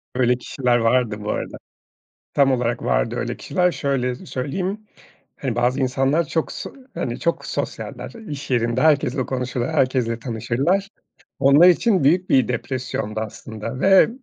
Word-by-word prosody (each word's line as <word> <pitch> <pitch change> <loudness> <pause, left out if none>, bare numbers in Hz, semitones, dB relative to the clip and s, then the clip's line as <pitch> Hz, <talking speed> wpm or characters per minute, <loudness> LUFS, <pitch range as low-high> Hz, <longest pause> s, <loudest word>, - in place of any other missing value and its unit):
Öyle 125 -1 +3
kişiler 125 -1 0
vardı 115 -1 +2
bu 105 - -2
arada. - - -4 0.8
Tam 140 -1 +4
olarak 120 -1 -1
vardı - - +1
öyle - - -3
kişiler. 180 +5 +1
Şöyle 135 -3 -1
söyleyeyim, 180 +7 -4 0.6
hani 130 -4 -2
bazı 125 +3 +1
insanlar 135 +5 +1
çok 160 - -1
so - - -7 0.2
hani 120 -1 -3
çok 170 0 -1
sosyaller - - -5 0.2
iş 145 -2 -6
yerinde, 120 0 +1
herkesle 140 -4 +2
konuşur, 125 -2 -2
herkesle 125 -4 +1
tanışırlar. 135 - -1 0.5
Onlar 145 +6 +7
için 185 - +3
büyük 180 +6 +3
bir 130 -4 +4
depresyondu 120 -3 -3
aslında 110 +2 -6
ve 195 +2 +6
130 Hz, 140 wpm, -22 LUFS, 120-145 Hz, 0.8 s, Onlar